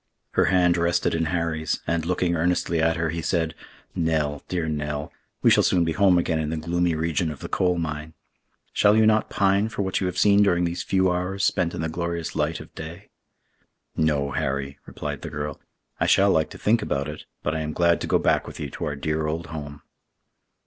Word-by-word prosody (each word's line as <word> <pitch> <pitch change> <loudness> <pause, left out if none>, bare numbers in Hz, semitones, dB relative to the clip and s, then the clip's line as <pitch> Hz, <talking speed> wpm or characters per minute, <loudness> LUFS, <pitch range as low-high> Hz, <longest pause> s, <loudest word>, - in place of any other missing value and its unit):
Her - - +3
hand 90 -2 +3
rested 85 0 +1
in 80 0 0
Harry's, 80 -1 -1
and, 85 0 -1
looking 90 -1 +1
earnestly 85 0 +1
at 80 0 +2
her, 80 -2 -1
he 85 0 -3
said, 80 0 0 0.4
"Nell, 75 -3 0
dear 85 -3 -2
Nell, 75 -1 -3 0.3
we - - +6
shall - - +6
soon 90 -2 +3
be 80 - 0
home 95 0 +4
again 80 -2 +1
in 75 -1 -2
the 80 - -2
gloomy 85 +1 0
region 80 +1 0
of 75 - -6
the - - -7
coal 90 -1 +1
mine. 80 -1 -4 0.6
Shall 105 +1 +4
you 110 - +5
not 110 0 +3
pine 100 +2 +2
for 105 - -2
what 95 +1 -1
you 95 - +1
have 90 0 -4
seen 100 +1 +5
during 90 -4 +3
these 85 +1 -2
few 95 -1 +2
hours 90 +2 -2
spent 90 -3 +1
in - - -3
the 80 - -1
glorious 85 0 -3
light 75 +1 0
of - - -12
day?" 85 +5 -9 0.8
"No, 75 -3 +1
Harry," 70 +1 -2
replied - - -5
the - - -6
girl; 75 -1 -5 0.4
"I - - +2
shall 100 0 +5
like 80 -3 +2
to - - -10
think 110 +1 +2
about 70 -8 -2
it, 75 0 -8 0.2
but 75 - 0
I 80 - -1
am 75 0 -3
glad 85 +1 +2
to - - -3
go - - +3
back - - +1
with - - -9
you 70 -2 -5
to - - -5
our 75 - -2
dear 75 +2 -1
old 80 +2 -3
home." 75 -2 -7
85 Hz, 220 wpm, -24 LUFS, 75-90 Hz, 0.8 s, we